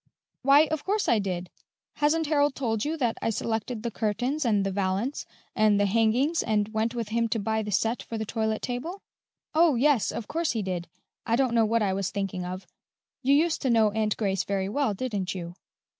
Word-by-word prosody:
"Why, 275 Hz, +2 st, +6 dB
of 315 Hz, -2 st, -2 dB
course 410 Hz, +2 st, 0 dB
I 225 Hz, -, +4 dB
did! 185 Hz, -3 st, -3 dB, 0.5 s
Hasn't 310 Hz, +2 st, +2 dB
Harold 290 Hz, -2 st, +2 dB
told 225 Hz, -5 st, -1 dB
you 315 Hz, +2 st, -2 dB
that 240 Hz, -6 st, -1 dB
I -, -, 0 dB
selected 225 Hz, +1 st, -2 dB
the 235 Hz, -, -2 dB
curtains, 245 Hz, +8 st, -1 dB
and 205 Hz, -4 st, +2 dB
the 195 Hz, -, -1 dB
valance, 195 Hz, +7 st, -2 dB, 0.3 s
and 215 Hz, -2 st, +4 dB
the 205 Hz, -, +3 dB
hangings, 230 Hz, -, +2 dB
and 210 Hz, -2 st, +1 dB
went 225 Hz, +2 st, 0 dB
with 230 Hz, -3 st, -3 dB
him 230 Hz, +1 st, +1 dB
to 225 Hz, +1 st, -1 dB
buy 220 Hz, +1 st, -1 dB
the 210 Hz, -, -5 dB
set 225 Hz, +5 st, +1 dB
for 230 Hz, -, -6 dB
the 220 Hz, -, -3 dB
toilette 220 Hz, 0 st, -2 dB
table?" 295 Hz, +11 st, -4 dB, 0.5 s
"Oh, 320 Hz, -2 st, +4 dB
yes, 265 Hz, -2 st, +3 dB
of 220 Hz, -, -5 dB
course 330 Hz, -2 st, -1 dB
he 220 Hz, -3 st, -2 dB
did. 180 Hz, -2 st, -3 dB, 0.4 s
I 230 Hz, -, +3 dB
don't 255 Hz, -1 st, +1 dB
know 230 Hz, -1 st, +4 dB
what 225 Hz, +1 st, +1 dB
I 195 Hz, -2 st, +1 dB
was 195 Hz, -1 st, -1 dB
thinking 195 Hz, -3 st, -3 dB
of. 185 Hz, +2 st, -6 dB, 0.6 s
You 275 Hz, +1 st, +4 dB
used 325 Hz, +2 st, +2 dB
to 265 Hz, -, 0 dB
know 225 Hz, -3 st, +4 dB
Aunt 215 Hz, 0 st, 0 dB
Grace 195 Hz, -3 st, 0 dB
very 195 Hz, -1 st, -2 dB
well, 260 Hz, -2 st, 0 dB
didn't 200 Hz, -5 st, -3 dB
you?" 170 Hz, -1 st, -6 dB
225 Hz, 210 wpm, -27 LUFS, 205-270 Hz, 0.6 s, Why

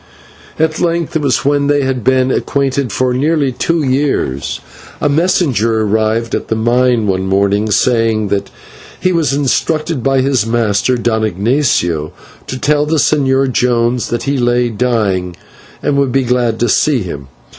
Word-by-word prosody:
At 155 Hz, 0 st, 0 dB
length, 170 Hz, -2 st, -1 dB
it 160 Hz, -, +1 dB
was 135 Hz, -3 st, 0 dB
when 145 Hz, 0 st, +2 dB
they 145 Hz, -1 st, +2 dB
had 130 Hz, -3 st, -2 dB
been 130 Hz, +1 st, +2 dB
acquainted 135 Hz, -3 st, -1 dB
for 130 Hz, +3 st, 0 dB
nearly 145 Hz, +1 st, +1 dB
two 165 Hz, +5 st, -1 dB
years, 130 Hz, -, -1 dB, 0.4 s
a -, -, +1 dB
messenger 140 Hz, -, +1 dB
arrived 110 Hz, +2 st, 0 dB
at -, -, -2 dB
the 110 Hz, -, -1 dB
mine 120 Hz, 0 st, +1 dB
one 95 Hz, -1 st, -1 dB
morning, 100 Hz, +2 st, +1 dB
saying 115 Hz, -1 st, +1 dB
that 100 Hz, 0 st, -2 dB, 0.5 s
he 185 Hz, -, +1 dB
was 165 Hz, -5 st, +1 dB
instructed 150 Hz, +2 st, -1 dB
by 135 Hz, +1 st, +2 dB
his 130 Hz, -4 st, +1 dB
master, 115 Hz, +1 st, 0 dB
Don 110 Hz, -2 st, 0 dB
Ignatio, 100 Hz, -, 0 dB, 0.3 s
to 130 Hz, -, -4 dB
tell 150 Hz, +2 st, +1 dB
the 160 Hz, -, 0 dB
Señor 135 Hz, -3 st, +2 dB
Jones 120 Hz, 0 st, 0 dB
that 120 Hz, -, -2 dB
he 140 Hz, -1 st, -1 dB
lay 120 Hz, 0 st, +1 dB
dying 105 Hz, -6 st, -1 dB, 0.5 s
and 140 Hz, -, +1 dB
would 140 Hz, -2 st, +1 dB
be 135 Hz, +2 st, +1 dB
glad 120 Hz, -2 st, 0 dB
to 120 Hz, -, +2 dB
see 130 Hz, +1 st, +2 dB
him. 70 Hz, -7 st, -7 dB
125 Hz, 160 wpm, -14 LUFS, 110-140 Hz, 0.5 s, when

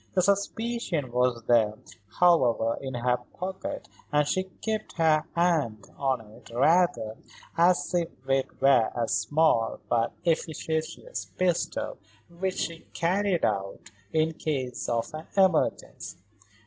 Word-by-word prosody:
The 185 Hz, -, +3 dB
suspicion 200 Hz, -, -1 dB
was 125 Hz, -1 st, +1 dB
there, 110 Hz, -3 st, +3 dB, 0.4 s
however, 125 Hz, -10 st, +4 dB
in 130 Hz, -2 st, -5 dB
her 125 Hz, +1 st, +1 dB, 0.2 s
pocket, 190 Hz, +1 st, -5 dB, 0.2 s
and 150 Hz, -1 st, +3 dB
she 185 Hz, +4 st, 0 dB
kept 215 Hz, +4 st, -4 dB
her 160 Hz, -2 st, +3 dB
hand 155 Hz, -11 st, +1 dB
on 135 Hz, -3 st, 0 dB
it 110 Hz, 0 st, -16 dB
rather 130 Hz, -4 st, +2 dB, 0.4 s
as 175 Hz, +2 st, +3 dB
if 170 Hz, -2 st, +1 dB, 0.2 s
it 135 Hz, 0 st, 0 dB
were 130 Hz, -4 st, +5 dB
a 120 Hz, -2 st, 0 dB
small 120 Hz, 0 st, +2 dB
but 115 Hz, -1 st, +1 dB
efficacious 160 Hz, -, -2 dB
pistol 185 Hz, -, -1 dB, 0.3 s
which 185 Hz, +2 st, -3 dB
she 165 Hz, 0 st, -3 dB, 0.2 s
carried 185 Hz, +1 st, +1 dB
about 100 Hz, -2 st, -2 dB, 0.2 s
in 160 Hz, 0 st, +1 dB
case 135 Hz, -6 st, -3 dB
of 120 Hz, +6 st, -1 dB
an 155 Hz, +1 st, -7 dB
emergency. 185 Hz, -, +1 dB
155 Hz, 120 wpm, -27 LUFS, 120-180 Hz, 0.4 s, were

